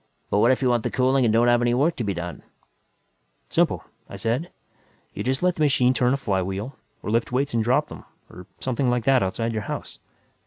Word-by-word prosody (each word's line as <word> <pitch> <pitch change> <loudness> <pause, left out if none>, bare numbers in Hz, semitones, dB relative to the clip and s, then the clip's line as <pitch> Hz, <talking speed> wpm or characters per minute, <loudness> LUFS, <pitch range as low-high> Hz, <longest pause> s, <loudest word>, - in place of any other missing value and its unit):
"But 100 - +3
what 115 - +5
if 130 +1 +2
you 130 - +3
want 120 -1 +2
the - - -2
cooling 130 0 +2
and 110 - +3
don't 115 +2 +3
have 120 0 +4
any 120 0 +2
work 150 +7 +2
to 120 - -2
be 100 -3 -2
done?" 85 -2 -6 1.1
"Simple," - - +1 0.3
I - - -8
said. 125 +10 -2 0.6
"You - - -4
just 130 +5 -1
let 180 0 +3
the - - -3
machine 130 -4 +3
turn 125 -1 +2
a - - -3
flywheel 100 +1 -2 0.3
or - - -3
lift 115 +2 0
weights 135 +2 0
and 115 -1 +1
drop 120 +3 +1
them, - - -10 0.2
or 90 +1 -12
something 130 0 -1
like 120 -1 0
that, 135 0 +4
outside 115 +5 -1
your 110 - -2
house. - - -6
120 Hz, 225 wpm, -24 LUFS, 110-130 Hz, 1.1 s, what